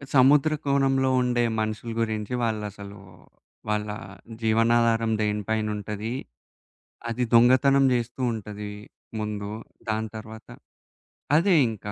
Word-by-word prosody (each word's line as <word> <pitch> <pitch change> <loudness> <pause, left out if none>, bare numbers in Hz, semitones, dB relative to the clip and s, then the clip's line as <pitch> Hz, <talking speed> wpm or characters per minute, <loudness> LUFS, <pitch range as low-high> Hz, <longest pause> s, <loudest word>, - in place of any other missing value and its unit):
సముద్రకోణంలో 140 -1 +3
ఉండే 120 -1 +1 0.2
మనుషుల 110 +2 -3
గురించి 110 0 -2
వాళ్ళసలు. 105 -2 -4 0.7
వాళ్ళ 105 0 0 0.5
జీవనాధారం 115 0 +3
దేనిపైనుంటది. 105 +1 -2 1.0
అది 125 +2 -1
దొంగతనం 130 +3 +5
జేస్తూంటది 115 -4 -3 0.5
ముందు. 105 -1 -4 0.4
దాని 110 0 -1
తర్వాత 110 0 -10 0.9
అదే 175 +3 +4
ఇంకా 105 -1 -6
110 Hz, 80 wpm, -25 LUFS, 105-125 Hz, 1.0 s, దొంగతనం